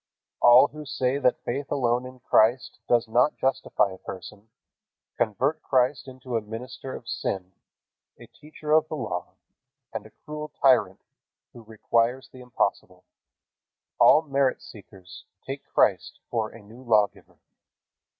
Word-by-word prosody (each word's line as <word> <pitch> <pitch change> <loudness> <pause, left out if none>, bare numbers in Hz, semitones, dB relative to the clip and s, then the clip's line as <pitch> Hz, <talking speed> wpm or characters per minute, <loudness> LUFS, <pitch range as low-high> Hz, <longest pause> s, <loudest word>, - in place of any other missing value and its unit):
All 120 +4 +7
who 150 0 -9
say 135 -1 -1
that 125 -2 +1
faith 135 +4 -4
alone 125 -1 0
in 130 -1 -14
Christ 120 +4 +2
does 120 -1 +3
not 125 +6 +2
justify 130 -6 0
a 95 - -12
person, 100 +3 -10 0.7
convert 135 +9 0
Christ 130 +1 +1
into 130 -1 -7
a 115 - +1
minister 125 +5 -8
of - - -11
sin, 95 -1 -3 0.7
a - - -13
teacher 150 0 -9
of 155 0 +4
the 155 - -5
Law, 110 -11 -5 0.6
and 110 -1 -5
a - - -21
cruel 150 0 -6
tyrant 115 -8 +3 0.5
who 120 - -12
requires 115 +3 -1
the 130 - -14
impossible. 100 -6 -2 1.0
All 155 - +7
merit 140 -3 0
seekers 95 -3 -14 0.2
take - - -6
Christ - - +2
for 110 -2 -1
a 115 -1 -14
new 115 +5 -15
lawgiver. 110 -5 0
125 Hz, 140 wpm, -25 LUFS, 110-135 Hz, 1.0 s, All